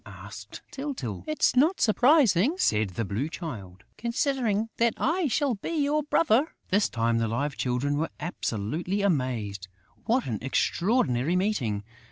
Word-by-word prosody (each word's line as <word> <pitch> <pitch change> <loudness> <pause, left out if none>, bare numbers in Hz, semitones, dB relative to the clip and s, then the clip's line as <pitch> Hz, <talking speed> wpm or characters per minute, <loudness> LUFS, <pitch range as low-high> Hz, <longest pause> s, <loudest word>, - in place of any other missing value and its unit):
asked - - -10
Tyltyl. 270 - -5
"It's 310 -3 +1
not 310 +9 +3
surprising," 245 - +4
said 110 - +2
the 100 +5 -3
Blue 110 +10 -2
Child, 100 - -7 0.2
"considering 235 -3 0
that 230 -1 +2
I 335 +3 +1
shall 280 +1 +1
be 305 +10 -3
your 295 +2 +1
brother!" 295 -1 +2
This 205 +2 +2
time, 115 -1 +1
the 115 - 0
Live 135 +6 -2
Children 130 +3 -1
were 160 +2 -1
absolutely 170 - -2
amazed. 120 - -1 0.4
What 245 +3 +1
an 110 -4 -3
extraordinary 155 - +1
meeting! 130 - 0
180 Hz, 140 wpm, -27 LUFS, -, 0.4 s, surprising